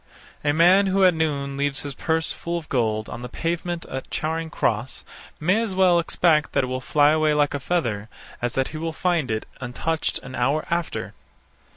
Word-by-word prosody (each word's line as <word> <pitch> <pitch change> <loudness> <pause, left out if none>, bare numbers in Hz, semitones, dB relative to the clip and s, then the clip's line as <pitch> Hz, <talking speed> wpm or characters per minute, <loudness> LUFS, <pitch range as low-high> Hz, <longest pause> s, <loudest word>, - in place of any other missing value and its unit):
A 145 - +3
man 180 +6 +5
who 190 0 +3
at 180 - +6
noon 140 -4 -1
leaves 140 -1 0
his 145 -1 -5
purse 160 +3 0
full 170 0 -3
of 160 -2 -7
gold 110 -4 0
on 120 - -7
the 125 - -6
pavement 170 +3 -3
at 135 - -6
Charing 160 +1 -2
Cross, 115 -3 -2 0.3
may 185 +8 +2
as 215 -5 -2
well 185 -2 +5
expect 165 -2 +2
that - - +2
it 130 0 -3
will 130 - -2
fly 145 +2 +4
away 155 -1 +2
like 145 -1 +2
a 145 - -2
feather, 115 -10 -1 0.3
as 120 -1 -1
that 135 0 +1
he 155 - -7
will 165 +1 -3
find 170 -5 0
it 110 -1 -2 0.2
untouched 155 +6 -2
an 130 - -9
hour 140 +6 0
after. 170 -1 -2
155 Hz, 200 wpm, -24 LUFS, 130-170 Hz, 0.3 s, at